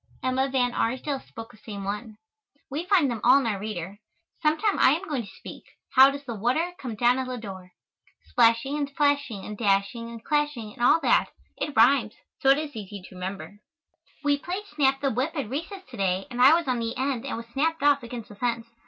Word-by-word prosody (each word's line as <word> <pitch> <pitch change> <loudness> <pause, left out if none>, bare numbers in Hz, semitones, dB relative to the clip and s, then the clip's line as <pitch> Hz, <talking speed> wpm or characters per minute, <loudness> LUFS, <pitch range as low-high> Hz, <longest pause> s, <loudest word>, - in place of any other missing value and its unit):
Emma 260 +1 +1
Van 250 -2 +1
Arsdale 260 +4 -1
spoke 225 -3 -11
the - - -18
same 205 -3 -7
one. 210 +2 -5 0.5
We 315 +6 -3
find 345 -10 +4
them 225 -3 -4
all 255 +3 +7
in 275 - -2
our 210 -4 -1
reader. 200 -1 -6 0.4
Sometime 315 +8 +1
I 265 - +6
am 395 - -10
going 285 -5 -1
to 205 - -10
speak, - - -10 0.3
"How 265 +1 +8
does 280 +1 -6
the 245 -4 -5
water 255 - 0
come 245 -5 -5
down 245 +3 +3
at 260 - -3
Ladore?" 200 -7 -7 0.6
Splashing 235 +4 +3
and 285 -1 -3
flashing 285 -8 +1
and 210 - -6
dashing 205 +3 0
and 230 -1 -10
clashing 295 -8 -1
and - - -12
all 250 +7 +5
that - - +3 0.3
it 295 - -4
rhymes, 235 -1 +4 0.3
so 270 - +3
it 275 - +6
is 300 -2 -5
easy 205 -2 -7
to 185 - -13
remember. 190 +2 -6 0.6
We 285 -1 +2
played 370 +7 -5
snap 275 -6 +1
the 275 -1 +1
whip 260 +8 -1
at 280 -7 -2
recess 365 +7 -5
to - - -9
day 190 -1 0
and 245 0 -2
I 275 +5 +8
was 340 -3 -1
on 250 -2 0
the 230 0 -3
end 260 -2 -1
and - - -3
was 230 - -7
snapped 320 +2 0
off 290 -1 +4
against 235 -1 -8
the 205 - -11
fence. 235 0 -2
250 Hz, 215 wpm, -26 LUFS, 220-285 Hz, 0.6 s, How